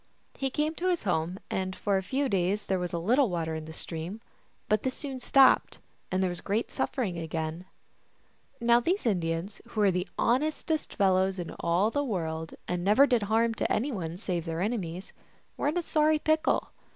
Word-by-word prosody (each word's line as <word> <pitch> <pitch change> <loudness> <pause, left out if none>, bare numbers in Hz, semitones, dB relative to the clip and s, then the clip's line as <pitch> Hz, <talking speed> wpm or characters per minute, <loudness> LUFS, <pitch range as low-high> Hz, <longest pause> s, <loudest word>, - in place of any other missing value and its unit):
He 270 -1 -2
came 300 +4 0
to 365 - -1
his 355 -2 0
home, 180 -2 0
and 185 0 -2
for 200 -1 0
a 190 - +2
few 270 +9 -1
days 195 0 0
there 190 -1 0
was 180 -1 -3
a 170 - -2
little 240 +9 +3
water 165 -2 -2
in 160 0 -5
the 160 - -8
stream; 165 +5 -5 0.5
but 215 0 +2
this 260 -1 -2
soon 270 -3 -5
stopped, 270 +1 +5 0.3
and 185 +1 +1
there 185 - +2
was 175 - -6
great 215 +4 -1
suffering 200 -11 -2
again. 160 +1 -4 0.9
Now 235 0 +5
these 355 - 0
Indians, 175 -2 -1
who 230 - -5
were 205 -2 +5
the 180 +1 -2
honestest 305 +5 0
fellows 190 -1 +3
in 175 -2 -5
all 175 +6 +2
the 285 +3 0
world, 160 - -3
and 180 -1 -2
never 210 +9 +6
did 245 -5 +2
harm 225 +1 +3
to - - -2
any 260 +7 +1
one 170 -6 -4
save 180 -4 -3
their 165 0 -3
enemies, 185 -4 -3 0.4
were - - -1
in 305 +4 0
a 350 - 0
sorry 310 0 +3
pickle. 310 +1 +1
195 Hz, 195 wpm, -29 LUFS, 175-255 Hz, 0.9 s, never